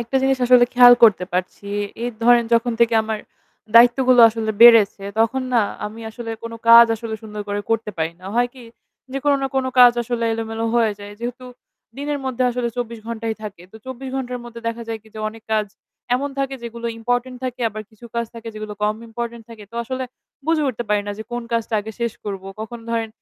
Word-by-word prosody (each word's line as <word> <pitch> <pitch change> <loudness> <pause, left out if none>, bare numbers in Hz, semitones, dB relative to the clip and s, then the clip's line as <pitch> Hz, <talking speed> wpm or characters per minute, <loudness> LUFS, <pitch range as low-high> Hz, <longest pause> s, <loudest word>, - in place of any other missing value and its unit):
একটা 235 +3 -2
জিনিস 270 0 +2
আসলে 245 0 +7
খেয়াল 245 0 +9
করতে 210 -5 +4
পারছি। 180 +2 -3 0.4
এই 240 - -1
ধরেন 240 0 +5
যখন 235 +1 +1
থেকে 235 -1 +4
আমার 220 -1 -3 0.6
দায়িত্বগুলো 245 +1 +6
আসলে 220 -1 -3
বেড়েছে। 225 -4 +7 0.2
তখন 255 +4 +1
না 240 - +4 0.3
আমি 215 +2 -9
আসলে 230 0 -7
কোন 230 0 -6 0.2
কাজ 235 0 +10
আসলে 225 0 -5
সুন্দর 210 -1 -6
করে 205 0 -2
করতে 225 -1 0
পারি 160 +1 -1
না। 185 - -11
হয় 245 0 +3
কি? 255 -2 -12 0.5
যে 275 - -2
কোন 290 - +4
না - - +1
কোন 265 - +1
কাজ 245 -1 +9
আসলে 235 0 -2
এলোমেলো 225 0 -3
হয়ে 230 -3 +3
যায়। 205 0 -9
যেহেতু 245 +1 -5 0.5
দিনের 290 +1 -3
মধ্যে 260 -1 -2
আসলে 245 0 -2
২৪ 235 -1 -4
ঘন্টাই 230 -1 -3
থাকে। 205 -5 -8
তো - - -11
২৪ 260 +1 -7
ঘন্টার 250 -2 -4
মধ্যে 235 -1 -10
দেখা 230 0 -5
যায় 225 -1 -3
কি 220 - -19
যে - - -8
অনেক 225 +1 -12
কাজ 215 -1 +1 0.5
এমন 280 +3 -1
থাকে 275 0 -1
যেগুলো 235 0 -6
ইম্পোর্টেন্ট 245 +2 -1
থাকে 255 -1 -4
আবার 215 0 -7
কিছু 220 +2 -18
কাজ 235 0 0
থাকে 230 0 -8
যেগুলো 215 -1 -6
কম 210 0 +2
ইম্পোর্টেন্ট 235 0 -6
থাকে। 220 -2 -11
তো - - -16
আসলে 260 +2 -4 0.4
বুঝে 325 -1 +2
উঠতে 240 -2 -4
পারি 210 0 +2
না 205 - -3
যে - - -4
কোন 240 0 -3
কাজটা 230 0 -1
আগে 220 +2 -8
শেষ 235 -2 -1
করবো? 195 -2 -5
কখন 225 +2 -6
ধরেন 230 -1 -1
235 Hz, 210 wpm, -21 LUFS, 220-245 Hz, 0.6 s, কাজ